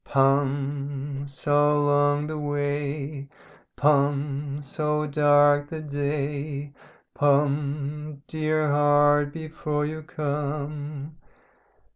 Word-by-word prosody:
"'Pum 140 Hz, 0 st, 0 dB
So 145 Hz, +2 st, +2 dB
long 145 Hz, 0 st, +2 dB
the 155 Hz, 0 st, -4 dB
way 145 Hz, -1 st, -3 dB, 0.5 s
Pum 145 Hz, 0 st, +1 dB
so 150 Hz, +1 st, -1 dB
dark 145 Hz, 0 st, +4 dB
the 160 Hz, -, -5 dB
day 145 Hz, -1 st, -3 dB, 0.4 s
Pum 145 Hz, 0 st, 0 dB
DEAR 155 Hz, -1 st, 0 dB
HEART! 145 Hz, 0 st, +4 dB
before 155 Hz, -1 st, -3 dB
you 155 Hz, +1 st, -4 dB
come.' 150 Hz, 0 st, -4 dB
145 Hz, 80 wpm, -25 LUFS, 140-150 Hz, 0.5 s, dark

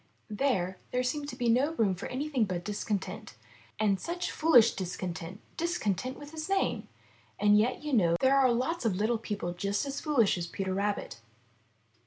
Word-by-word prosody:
There, 190 Hz, -6 st, 0 dB
there 250 Hz, 0 st, 0 dB
seemed 285 Hz, +3 st, -2 dB
to 245 Hz, -, -6 dB
be 245 Hz, -1 st, -1 dB
no 260 Hz, +7 st, +3 dB
room 210 Hz, -9 st, +2 dB
for 180 Hz, -, -6 dB
anything 265 Hz, -2 st, 0 dB
but 180 Hz, -3 st, -3 dB
discontent. 205 Hz, -1 st, -4 dB, 0.4 s
And 200 Hz, -3 st, +2 dB
such 350 Hz, +1 st, -3 dB
fooHsh 305 Hz, -8 st, +5 dB
discontent 180 Hz, 0 st, -5 dB
— -, -, -32 dB
discontent 255 Hz, -, -1 dB
with 290 Hz, 0 st, -10 dB
his 315 Hz, +2 st, -6 dB
name! 390 Hz, 0 st, 0 dB, 0.5 s
And 205 Hz, 0 st, +5 dB
yet 225 Hz, +5 st, +2 dB
do -, -, -12 dB
you 295 Hz, -, -2 dB
know, 175 Hz, -8 st, +4 dB
there 265 Hz, +1 st, +4 dB
are 260 Hz, -2 st, +5 dB
lots 260 Hz, +8 st, -1 dB
of 225 Hz, -4 st, +2 dB
Httle 220 Hz, +4 st, 0 dB
people 205 Hz, -6 st, -3 dB
just 200 Hz, +6 st, -1 dB
as 275 Hz, 0 st, -4 dB
foolish 235 Hz, -, +2 dB
as 170 Hz, -, -3 dB
Peter 190 Hz, +2 st, -3 dB
Rabbit. 200 Hz, -, -2 dB
225 Hz, 185 wpm, -30 LUFS, 195-275 Hz, 0.5 s, fooHsh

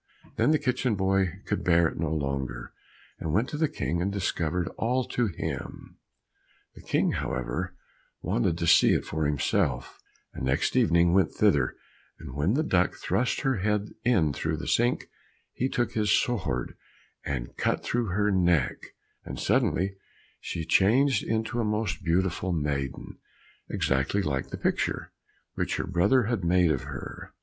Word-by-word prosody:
Then 115 Hz, +5 st, +2 dB
the 155 Hz, -, +5 dB
kitchen 125 Hz, -4 st, 0 dB
boy 95 Hz, -1 st, +2 dB, 0.2 s
could 105 Hz, -, -2 dB
bear 85 Hz, -1 st, +4 dB
it -, -, -6 dB
no 80 Hz, -1 st, 0 dB
longer, 70 Hz, -5 st, -3 dB, 0.5 s
and 80 Hz, -, -3 dB
went 110 Hz, +8 st, +2 dB
to 150 Hz, -, -4 dB
the 160 Hz, +1 st, +2 dB
King 85 Hz, -, -2 dB
and 95 Hz, +3 st, 0 dB
discovered 90 Hz, -3 st, -1 dB
all 125 Hz, +3 st, 0 dB
to 120 Hz, -2 st, +1 dB
him. 90 Hz, -, -6 dB, 0.7 s
The -, -, -13 dB
King, -, -, +1 dB
however, 65 Hz, -1 st, -3 dB, 0.4 s
wanted 80 Hz, +7 st, 0 dB
to 85 Hz, -, -2 dB
see 85 Hz, -, +6 dB
it -, -, -1 dB
for 80 Hz, -1 st, -1 dB
himself, 75 Hz, -2 st, 0 dB, 0.3 s
and -, -, -6 dB
next 65 Hz, +1 st, 0 dB
evening 85 Hz, +1 st, +4 dB
went 95 Hz, -4 st, +3 dB
thither, -, -, +2 dB, 0.4 s
and 65 Hz, -, -9 dB
when 75 Hz, -, +1 dB
the 155 Hz, -, +2 dB
duck 90 Hz, -, +2 dB
thrust 125 Hz, +2 st, 0 dB
her 135 Hz, -4 st, +1 dB
head 105 Hz, +1 st, 0 dB
in 90 Hz, -, +3 dB
through 80 Hz, +3 st, -2 dB
the 80 Hz, -, -6 dB
sink, 120 Hz, +2 st, +2 dB, 0.5 s
he 130 Hz, -, -1 dB
took 120 Hz, -3 st, 0 dB
his 105 Hz, -1 st, 0 dB
sword 85 Hz, -, 0 dB, 0.5 s
and 60 Hz, -4 st, -4 dB
cut -, -, 0 dB
through 120 Hz, -1 st, -1 dB
her 105 Hz, +3 st, +1 dB
neck, 85 Hz, -8 st, +2 dB, 0.5 s
and -, -, -7 dB
suddenly 95 Hz, +2 st, +1 dB, 0.4 s
she 80 Hz, -, -4 dB
changed 120 Hz, -, +4 dB
into 115 Hz, +2 st, -2 dB
a -, -, +1 dB
most 105 Hz, -3 st, -1 dB
beautiful 90 Hz, +2 st, 0 dB
maiden, 70 Hz, -4 st, -3 dB, 0.5 s
exactly 65 Hz, +9 st, 0 dB
like 65 Hz, -4 st, -1 dB
the -, -, -6 dB
picture, -, -, -1 dB, 0.4 s
which -, -, -1 dB
her -, -, -2 dB
brother 95 Hz, +8 st, +3 dB
had 110 Hz, -3 st, -1 dB
made 90 Hz, -1 st, +3 dB
of 65 Hz, -, -2 dB
her. -, -, -8 dB
90 Hz, 160 wpm, -27 LUFS, 80-110 Hz, 0.7 s, see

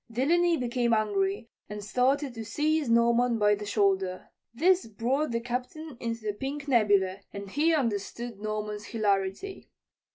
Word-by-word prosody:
Delany 335 Hz, +8 st, +2 dB
became 240 Hz, -2 st, +1 dB
angry 205 Hz, 0 st, 0 dB, 0.2 s
and 210 Hz, 0 st, -6 dB
started 265 Hz, +4 st, +1 dB
to 225 Hz, -1 st, -6 dB
seize 300 Hz, +5 st, 0 dB
Norman 235 Hz, +1 st, +3 dB
by 210 Hz, -1 st, +4 dB
the 205 Hz, 0 st, -4 dB
shoulder. 195 Hz, -3 st, 0 dB, 0.2 s
This 350 Hz, +6 st, +2 dB
brought 245 Hz, +8 st, -1 dB
the 230 Hz, -1 st, -1 dB
Captain 250 Hz, +5 st, -5 dB
into 230 Hz, -1 st, -3 dB
the 210 Hz, -, -1 dB
pink 275 Hz, +6 st, -5 dB
nebula 200 Hz, -6 st, +3 dB
and 200 Hz, -1 st, -8 dB
he 305 Hz, +7 st, +2 dB
understood 235 Hz, -3 st, -3 dB
Norman's 210 Hz, -1 st, -4 dB
hilarity. 205 Hz, -, -2 dB
230 Hz, 140 wpm, -28 LUFS, 210-270 Hz, 0.2 s, by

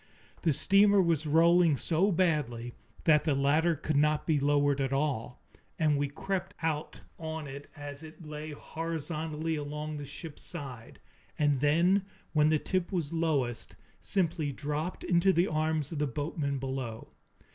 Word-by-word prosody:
The 165 Hz, -, +3 dB
steamer 200 Hz, +6 st, +5 dB
was 165 Hz, -4 st, +2 dB
rolling 165 Hz, 0 st, +5 dB
so 180 Hz, +8 st, +1 dB
badly 145 Hz, -10 st, 0 dB, 0.3 s
that 150 Hz, -2 st, +5 dB
the 150 Hz, -3 st, +1 dB
ladder 155 Hz, +5 st, +3 dB
could 155 Hz, +1 st, -2 dB
not 150 Hz, +1 st, +2 dB
be 155 Hz, -3 st, +2 dB
lowered 145 Hz, 0 st, +2 dB
at 135 Hz, -1 st, 0 dB
all, 135 Hz, -4 st, -2 dB, 0.3 s
and 155 Hz, -2 st, +3 dB
we 145 Hz, 0 st, +1 dB
crept 185 Hz, +6 st, -4 dB
out 155 Hz, -2 st, -2 dB, 0.2 s
on 160 Hz, -1 st, -4 dB
it 140 Hz, +1 st, -9 dB
as 145 Hz, -1 st, -8 dB
it 160 Hz, +1 st, -12 dB
lay 150 Hz, 0 st, -6 dB
horizontally 160 Hz, 0 st, -3 dB
along 150 Hz, +1 st, -4 dB
the 145 Hz, -, -6 dB
ship's 145 Hz, +2 st, -9 dB
side, 135 Hz, -9 st, -8 dB, 0.4 s
and 145 Hz, -3 st, +2 dB
then, 170 Hz, +7 st, +3 dB, 0.3 s
when 150 Hz, -1 st, +4 dB
the 155 Hz, -, +4 dB
tip 185 Hz, +4 st, -2 dB
was 170 Hz, -5 st, -2 dB
lowest, 145 Hz, -8 st, -1 dB, 0.2 s
simply 160 Hz, -, 0 dB
dropped 150 Hz, +5 st, -4 dB
into 175 Hz, +2 st, +4 dB
the 175 Hz, 0 st, +3 dB
arms 155 Hz, -2 st, -1 dB
of 160 Hz, -, -3 dB
the 150 Hz, -, +1 dB
boatmen 145 Hz, +1 st, -2 dB
below. 130 Hz, -4 st, -5 dB
155 Hz, 155 wpm, -30 LUFS, 145-165 Hz, 0.4 s, steamer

